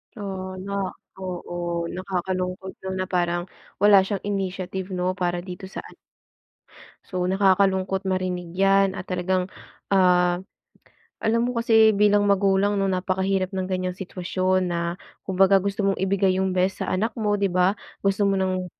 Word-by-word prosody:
Oo, 190 -3 -5
no? 200 0 -5 0.5
Oo, 175 -2 -4
nakakalungkot 185 0 -3
lang 190 0 -3
na - - -1
parang 175 -1 0 0.4
wala 205 -1 +7
siyang 200 -1 -3
initiative, 190 -2 -3
'no, 180 0 0
para 175 -1 -1
dito 185 0 -8
sa - - -7
an - - -14 1.1
So, 185 -1 -4
nakakalungkot 190 0 +2
marinig 180 -2 -2
yan 195 0 +3
at 185 - -6
talagang, 185 0 0 0.5
ah, 180 -1 +4 0.8
alam 230 +1 +1
mo 250 -1 -2
kasi 220 -1 +5
bilang 205 0 +4
magulang, 200 +1 +2
no? 195 - +1
Napakahirap 190 0 0
ng 185 -1 -2
ganyang 185 -1 -2
sitwasyon 185 0 -1
na 170 0 -1 0.5
kumbaga 195 +1 +4
gusto 200 +2 -2
mong 195 - +1
ibigay 190 0 +1
yung 190 -1 0
best 185 +1 0
sa - - -2
anak 215 +6 0
mo, 210 -1 +1
di 200 -1 +1
ba? 185 +2 +3 0.3
Gusto 195 +1 +1
mo 195 - +2
ng 185 -1 -1
190 Hz, 150 wpm, -24 LUFS, 185-195 Hz, 1.1 s, wala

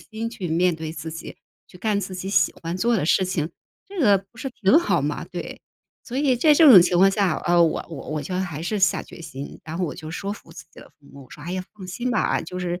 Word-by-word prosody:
新 225 +1 -6
去 190 -7 -5
面 175 +2 +2
对 160 -1 -6
自 160 +1 -6
己， 165 - -8 0.3
去 - - -15
干 210 0 0
自 185 -1 -6
己 185 +1 -5
喜 - - +3
欢 165 +1 -3
做 235 +3 +2
的 175 - 0
事 190 - +3
情， 165 -3 -2 0.4
这 390 -2 -6
个 205 -8 +5
不 195 +4 -20
是 270 - -4
挺 240 - +4
好 345 - +1
吗？ - - -2
对。 - - -7 0.4
所 255 +2 -4
以 275 -3 +3
在 300 +5 +4
这 310 +1 +6
种 190 -9 +10
情 175 0 +1
况 195 - +7
下， 195 -4 +1
呃， 175 0 +5
我 165 - 0
我 160 - -8
我 155 -1 -2
觉 180 - -5
得 185 - 0
还 160 -5 -4
是 210 +6 -2
下 190 - +3
决 170 - -12
心， 145 -4 -8
然 165 +2 -6
后 180 - +1
我 - - -4
就 155 -2 -8
说 200 +4 -4
服 - - -12
自 - - -11
己 - - -13
的 - - -15
父 145 -2 -26
母， 140 -1 -12
我 - - -22
说： 150 - -11
“哎 175 - -4
呀， 185 0 -2
放 200 -3 -10
心 240 +8 -3
吧， - - +1
就 180 - -7
是 175 0 -3
185 Hz, 295 characters per minute, -23 LUFS, 165-220 Hz, 0.4 s, 种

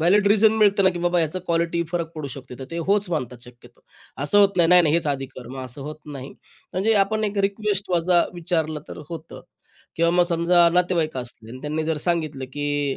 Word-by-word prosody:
Valid 200 +5 +4
reason 215 +1 +5
मिळतं 205 -3 +3
ना, 190 - +6
की 175 - -6
बाबा 175 0 +1
ह्याचं 165 +2 0
क्वालिटी 170 0 0
फरक 170 -2 -2
पडू 155 -2 -5
शकते, 130 -1 -9
तर 130 - -6
ते 170 - -4
होच 200 -1 +2
मानतात 125 -6 -3
शक्यतो. 120 -1 -17 0.4
असं 205 +8 +3
होत 200 -1 +7
नाही, 170 -2 +4
नाही-नाही 175 -3 +5
हेच 170 -2 +1
आधी 135 -1 -2
कर, 130 -2 -12
मग 130 +1 -8
असं 130 +3 -8
होत 150 +2 -6
नाही. 140 -2 -7 0.4
म्हणजे 210 +5 +1
आपण 215 +1 -2
एक 205 -1 -2
रिक्वेस्ट 200 -1 -3
माझा 175 0 +3
विचारलं 160 -3 -2
तर - - -8
होतं 165 -1 -8 0.6
किंवा 170 0 +3
मग 175 0 +4
समजा 170 0 +4
नातेवाईक 175 -4 +1
असले 115 -2 -9
आणि 130 +2 -9
त्यांनी 155 +1 -2
जर 160 0 -1
सांगितलं, 155 -6 -1
की 145 -1 -1
170 Hz, 210 wpm, -23 LUFS, 145-180 Hz, 0.6 s, होत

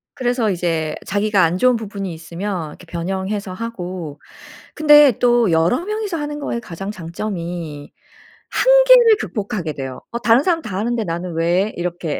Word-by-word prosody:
그래서 245 -4 0
이제 165 -4 -1
자기가 205 -1 +1
안 165 +2 +1
좋은 250 +5 +4
부분이 200 -4 -5
있으면 170 +1 -5
이렇게 175 - -13
변형해서 190 +4 -4
하고. 180 -8 -6 0.6
근데 295 -5 +6
또 240 -4 +3
여러 165 - +2
명이서 425 -3 -3
하는 295 -1 -4
것의 235 -5 -3
가장 195 -1 -7
장점이 170 -5 -6 0.6
한계를 - - +6
극복하게 195 - -4
돼요. 135 -2 -7
'어 235 - -3
다른 235 +3 +4
사람 335 -2 +1
다 195 -8 -5
하는데 230 +2 -1
나는 175 0 -4
왜?' 175 +5 +1
이렇게. 175 -2 -3
195 Hz, 330 characters per minute, -19 LUFS, 170-240 Hz, 0.6 s, 근데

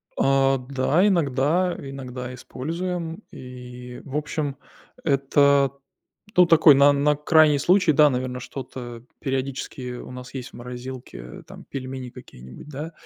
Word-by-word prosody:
Э, 135 0 +3
да, 140 +7 +2
иногда 170 +1 +1
иногда 130 -2 -7
используем. 165 - -5
И 125 -1 -10
в 140 - -8
общем, 150 -2 -3 0.5
это, 140 -1 +3 0.7
ну, 180 -1 +7
такой 160 -3 +7
на 140 +1 +6
на 145 +1 +2
крайний 150 -1 +4
случай, 180 +2 +4
да, 150 0 +6
наверно, 125 0 -3
что-то 125 -2 -8 0.2
периодически 130 -2 -4
у - - -9
нас 125 +1 -10
есть 130 -2 -6
в - - -33
морозилке, 125 - -8
там, - - -12
пельмени 130 -2 -6
какие-нибудь, 65 - -13
да. 150 +3 -6
135 Hz, 130 wpm, -24 LUFS, 125-150 Hz, 0.7 s, ну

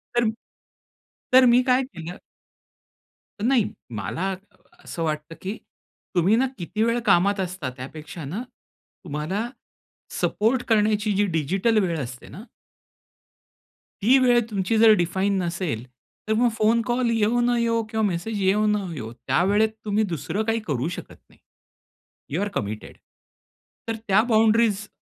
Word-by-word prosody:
तर, 235 -2 +3 1.0
तर 260 0 +8
मी 245 0 +6
काय 255 +1 +4
केलं. 175 - -8 1.2
नाही 240 -1 +3 0.3
मला 105 - -3
अ, - - -3 0.5
असं 165 - -5
वाटतं 155 0 -3
की 200 +4 -4 0.6
तुम्ही 180 +5 +4
ना 255 +3 +3
किती 210 +4 -2
वेळ 230 +1 +1
कामात 200 0 +3
असता 180 -6 -3
त्यापेक्षा 150 +5 -8
ना, 180 +12 -4 0.6
तुम्हाला 180 +8 -3 0.7
सपोर्ट 235 +4 +1
करण्याची 215 -1 +2
जी 205 +1 +3
डिजिटल 190 +6 0
वेळ 170 -3 -1
असते 125 -2 -7
ना 205 - -10 1.6
ती 250 +6 +6
वेळ 245 -2 +5
तुमची 200 +1 0
जर 220 0 +7
डिफाइन 190 +4 0
नसेल. 170 - -3 0.4
तर 220 - +2
मग 240 0 +4
फोन 225 +2 +3
कॉल 245 0 +1
येऊ 225 +1 +2
न 240 0 +2
येवो 230 -1 +1
किंवा 220 0 -1
मेसेज 200 +3 -2
येऊ 200 +3 +3
न 210 - +3 0.2
येवो, 115 -5 -6
त्यावेळेत 195 - +2 0.2
तुम्ही 210 +1 +1
दुसरं 165 +6 -2
काही 225 +1 0
करू 140 -1 -1
शकत - - -10
नाही. - - -23 1.0
You 170 - 0
R 205 - 0
committed. 105 +1 -5 0.9
तर 225 - -1
त्या 200 +1 +5
बाउंडरीज 220 -2 +3
205 Hz, 140 wpm, -24 LUFS, 170-225 Hz, 1.6 s, तर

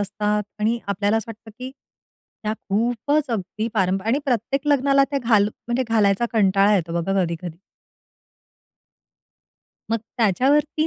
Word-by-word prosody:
असतात 210 +1 -1 0.2
आणि 225 +3 +1
आपल्याला 205 +2 +1
असं 225 +1 -3
वाटतं, 225 0 -12
की 255 +1 -6 0.7
त्या 215 - -1 0.2
खूपच 245 +7 0
अगदी 215 +1 -3
पारंपरिक 190 0 0
आणि 260 +5 +2
प्रत्येक 270 +3 -1
लग्नाला 275 -1 +4
त्या 280 - 0
घाल 215 -3 +3
म्हणजे 240 +3 -3
घालायचा 215 0 +2
कंटाळा 200 -1 +3
येतो 170 -3 -1
बघा 195 +3 -2
कधी-कधी. 170 -1 -5 2.3
मग 230 - +1 0.2
त्याच्यावरती 285 - +2
220 Hz, 125 wpm, -22 LUFS, 200-250 Hz, 2.3 s, लग्नाला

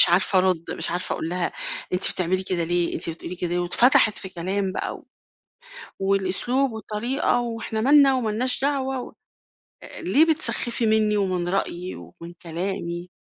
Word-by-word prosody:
مش - - +10
عارفة 185 +2 +3
أرد 185 -3 +1
مش - - -3
عارفة 175 +1 -3
أقول 160 - -4
لها 180 +1 -2 0.4
أنتِ 180 - +6
بتعملي 185 +1 -1
كده 180 -3 -1
ليه؟ 175 0 +1
أنتِ 165 - -1
بتقولي 170 +2 -8
كده 175 0 -2
واتفتحت 215 +3 +4
في 190 - -6
كلام 190 +2 -3
بقى - - -4
و - - -20 0.9
والأسلوب 195 +7 0
والطريقة 220 +4 -1
وإحنا 225 -2 -4
مالنا 275 +1 +5
ومالناش 245 +1 -1
دعوة 270 -2 -1
و - - -9 0.7
آآ - - -10
ليه، 325 -3 +3
بتسخفي 255 -7 +3
مني 215 -1 +2
ومن 185 -3 -1
رأيي 180 -1 -3
ومن 90 - -12
كلامي؟ 175 0 -5
195 Hz, 155 wpm, -23 LUFS, 175-240 Hz, 0.9 s, مش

